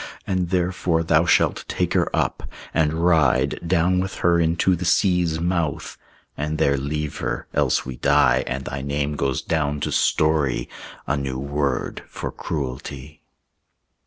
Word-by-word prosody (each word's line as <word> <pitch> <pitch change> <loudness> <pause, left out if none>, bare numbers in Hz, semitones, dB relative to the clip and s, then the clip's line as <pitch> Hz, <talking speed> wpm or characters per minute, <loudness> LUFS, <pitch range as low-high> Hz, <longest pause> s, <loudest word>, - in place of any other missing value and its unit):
And 90 -2 -1
therefore 90 -2 0
Thou 80 0 +3
shall - - +4
take - - -3
her - - +2
up, - - -1 0.2
and 80 +2 +1
ride 80 -4 +3
"Down 90 +1 +2
with 95 +1 -3
her 85 -1 +4
into 85 +3 +2
the 85 - -5
sea's 90 -2 +2
mouth, 85 -3 -1 0.4
And 75 +1 -3
there 70 - +3
leave 75 +2 -3
her; - - -3
else - - +1
we 65 -1 -6
die, 65 +2 +3
And 65 +2 -3
thy 70 +2 -4
name 70 +1 -2
goes 70 -2 -1
down 75 -2 -1
to - - -2
story 75 -6 +1 0.4
A 75 - 0
new 70 -2 -3
word 70 -1 -2
for - - -6
cruelty." 70 +1 -6
75 Hz, 150 wpm, -22 LUFS, 70-85 Hz, 0.4 s, shall